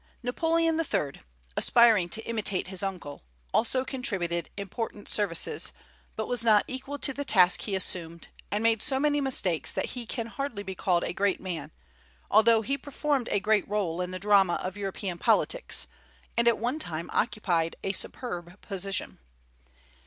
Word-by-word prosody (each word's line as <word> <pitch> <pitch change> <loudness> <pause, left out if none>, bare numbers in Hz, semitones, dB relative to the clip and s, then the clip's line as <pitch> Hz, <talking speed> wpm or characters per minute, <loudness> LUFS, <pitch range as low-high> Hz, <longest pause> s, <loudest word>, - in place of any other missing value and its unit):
Napoleon 325 +5 +1
III., 150 - -1 0.3
aspiring 225 -7 +5
to 225 +5 -1
imitate 205 -5 -1
his 190 -2 -3
uncle, 180 -8 -5 0.3
also 255 +3 +2
contributed 190 - -2
important 205 +1 -5
services, 195 -6 0 0.4
but 220 - -3
was 245 -2 0
not 215 -3 +5
equal 265 +2 -5
to 270 -1 +1
the 285 - -3
task 180 -9 +5
he 200 - -2
assumed, 170 -3 -2 0.2
and 210 +2 -1
made 225 -1 +3
so 265 -1 +1
many 290 0 +2
mistakes 195 - +1
that - - -2
he 245 -2 -5
can 230 -1 -3
hardly 230 -3 -4
be 190 -1 -5
called 175 -2 +1
a - - -2
great 200 +1 +1
man, 175 -5 -5 0.6
although 220 +2 +5
he 275 +6 -1
performed 285 -3 -1
a 205 - +2
great 210 -1 +1
rôle 180 -4 -1
in 180 - -4
the 185 - -4
drama 195 -2 +4
of 185 +1 -4
European 195 -3 -4
politics, - - +1 0.5
and 235 0 +2
at 235 - +5
one 245 +7 -2
time 170 - -3
occupied 170 -6 0
a 195 - 0
superb 180 -3 -3
position. 195 -1 -2
205 Hz, 160 wpm, -28 LUFS, 185-245 Hz, 0.6 s, aspiring